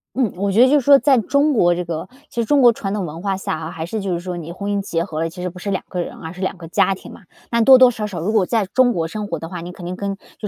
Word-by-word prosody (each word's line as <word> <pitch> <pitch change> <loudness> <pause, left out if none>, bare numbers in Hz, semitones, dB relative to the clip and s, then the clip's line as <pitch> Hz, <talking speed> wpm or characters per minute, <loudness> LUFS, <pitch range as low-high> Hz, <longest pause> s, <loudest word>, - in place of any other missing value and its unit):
嗯， 245 -6 0
我 200 +1 0
觉 215 +5 +4
得 255 - +7
就 290 +2 +4
是 - - -3
说 280 +2 +7
在 275 -1 +3
中 280 +6 +2
国 175 -7 +3
这 180 - -3
个 165 -2 -5 0.2
其 - - -19
实 - - -1
中 285 +4 +3
国 240 -2 +7
传 195 -2 -4
统 205 -3 -2
文 160 +1 -7
化 195 -1 -1
下 195 - -3
啊， 160 0 -6
还 160 0 -5
是 215 +5 -4
就 195 -2 -2
是 170 - -2
说 180 0 -5
你 170 -1 -7
婚 200 +3 -4
姻 200 - 0
结 170 -4 -2
合 160 -4 -5
了， 165 +1 -1
其 180 +2 -10
实 180 - -2
不 180 +1 -12
是 200 - -5
两 190 - -2
个 180 - -2
人， - - -6
而 160 +1 -8
是 185 - -10
两 190 0 -2
个 170 -2 -10
家 190 +3 +2
庭 - - -12
嘛。 - - -14 0.3
那 235 -1 +2
多 260 +3 +8
多 255 -1 +7
少 215 -3 -4
少 190 -5 -6
如 180 +6 -1
果 210 -4 +3
在 220 +1 0
中 245 +5 +2
国 165 -3 -1
生 210 +5 -5
活 170 - -3
的 165 - -7
话， 175 -1 -6
你 175 +1 -7
肯 180 0 -10
定 180 +1 -4
跟 200 +1 -3 0.2
就 210 - -5
195 Hz, 380 characters per minute, -20 LUFS, 175-225 Hz, 0.3 s, 多